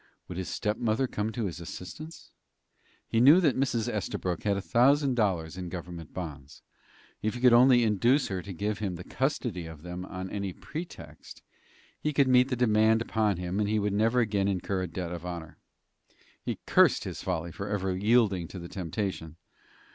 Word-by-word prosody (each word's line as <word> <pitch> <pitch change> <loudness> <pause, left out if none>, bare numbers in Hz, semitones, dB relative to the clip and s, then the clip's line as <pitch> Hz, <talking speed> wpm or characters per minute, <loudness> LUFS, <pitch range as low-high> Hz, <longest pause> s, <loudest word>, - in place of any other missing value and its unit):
Would 90 0 -6
his 95 - -4
stepmother 110 +4 0
come 110 -3 -2
to 115 0 -2
his 90 -2 -4
assistance? 120 - -9 0.8
He 115 - +1
knew 145 +8 +8
that 155 -8 +3
Mrs. 125 -4 0
Estabrook 90 -3 -2
had 100 -1 +2
a - - -1
thousand 135 +6 +3
dollars 90 -8 0
in 90 -1 -5
government 85 -2 -7
bonds. 75 -6 -8 0.6
If 110 +3 -1
he - - -5
could 125 -1 +6
only 125 0 +6
induce 115 +6 +3
her 95 -2 -2
to 100 - -8
give 100 +3 -2
him 100 -4 -2
the 90 - -8
custody 120 - -2
of 80 -2 -11
them 90 +1 -6
on 95 0 -6
any 100 -2 -3
pretext, 165 - -9 0.6
he 150 - -1
could 140 -1 +4
meet 125 0 +5
the 130 - 0
demand 110 -1 +3
upon 110 -4 0
him, 90 +2 -3
and 105 -1 +1
he 110 - +1
would 105 -1 0
never 115 +4 +3
again 105 -3 +1
incur 95 0 -1
a 90 - -2
debt 85 +1 -5
of 85 -1 -6
honor. 85 -3 -7 0.8
He - - -3
cursed - - +4
his - - -6
folly 85 -2 -2
for 100 +4 -6
ever 95 -2 -1
yielding 100 -3 +2
to 95 - -9
the 85 -1 -7
temptation. 85 -3 -4
100 Hz, 185 wpm, -28 LUFS, 90-120 Hz, 0.8 s, knew